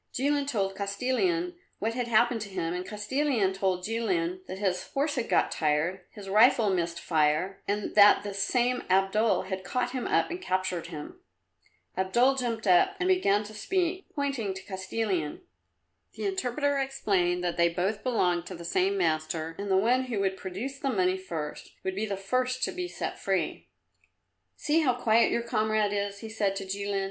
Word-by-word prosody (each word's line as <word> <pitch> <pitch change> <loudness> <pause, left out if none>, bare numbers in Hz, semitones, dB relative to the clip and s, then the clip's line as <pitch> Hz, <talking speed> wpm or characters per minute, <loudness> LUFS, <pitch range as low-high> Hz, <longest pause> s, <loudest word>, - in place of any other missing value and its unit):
Jilin 285 +2 0
told 195 -7 -1
Kostilin 260 - 0 0.2
what 225 +2 -1
had 245 0 -2
happened 235 0 +3
to 200 - -5
him, 175 -3 -2
and 180 0 -3
Kostilin 215 0 0
told 190 -2 -1
Jilin 340 - -1
that 190 - -6
his 190 -2 -1
horse 285 +2 +1
had 245 -3 -2
got - - +2
tired, 160 +4 0
his 205 -3 -11
rifle 215 +1 +5
missed 170 -2 -1
fire, 155 +4 +1
and 205 +1 -2
that 205 -1 +7
this 200 -1 -4
same 250 +3 +1
Abdul 195 +1 +3
had 190 0 -5
caught 245 +5 -1
him 255 -2 -3
up - - +1
and 355 +2 -5
captured 185 - -1
him. 160 - -8 0.8
Abdul 235 +8 +3
jumped 235 -4 -2
up 195 - +4
and 370 0 +1
began 215 - +3
to 210 +1 -10
speak, 365 - -1
pointing 270 -10 -2
at 190 - -11
Kostilin. 190 -4 -2 0.7
The - - -4
interpreter 285 -6 0
explained 190 -10 0
that 175 -1 -1
they 170 0 +4
both 190 +5 -2
belonged 180 -9 +1
to 185 - -6
the 170 0 -9
same 380 - +1
master, 160 - -1
and 200 - -4
that 190 - +3
the 190 - +4
one 250 +4 +2
who 235 -5 -2
would 190 -1 0
produce 210 +10 -6
the 275 - -1
money 185 -6 +2
first 165 -5 -6
would 190 - -2
be 210 +3 -2
the 200 -2 -3
first 255 +6 -1
to - - +1
be 360 0 -4
set - - -5
free. - - -1 0.9
"See 305 +2 +1
how 260 -6 +2
quiet 230 -2 +3
your 235 - 0
comrade 215 -2 +1
is," 200 0 -2
he 225 - -6
said 205 -3 0
to 195 - -4
Jilin. 200 +1 -2
205 Hz, 185 wpm, -28 LUFS, 190-255 Hz, 0.9 s, that